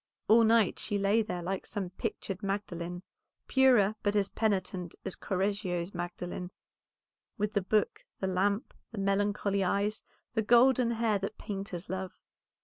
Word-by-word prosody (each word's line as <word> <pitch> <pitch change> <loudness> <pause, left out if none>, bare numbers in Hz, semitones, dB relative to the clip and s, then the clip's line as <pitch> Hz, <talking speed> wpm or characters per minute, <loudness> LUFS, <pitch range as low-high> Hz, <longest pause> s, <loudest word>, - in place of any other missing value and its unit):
All 230 +2 +7
night 225 -3 +4
she 205 - -1
lay 200 +3 +3
there 180 -5 -4
like 190 +2 -3
some 195 -4 -4
pictured 195 -1 -4
Magdalene, 180 -3 -3 0.4
purer 250 -7 +5
but 205 0 0
as 200 -2 +2
penitent 190 -5 -1
as 190 - -3
Correggio's 190 -2 -2
Mary, 175 0 -5 0.9
with 210 0 -1
the 205 - +2
book, 210 +3 0 0.2
the - - -1
lamp, 200 +5 0 0.2
the 225 - -9
melancholy 200 0 +1
eyes, 200 +3 0 0.3
the 220 - +1
golden 240 +2 +5
hair 225 -3 +1
that 200 +2 -4
painters 195 -3 -5
love. 190 0 -4
200 Hz, 140 wpm, -30 LUFS, 185-215 Hz, 0.9 s, All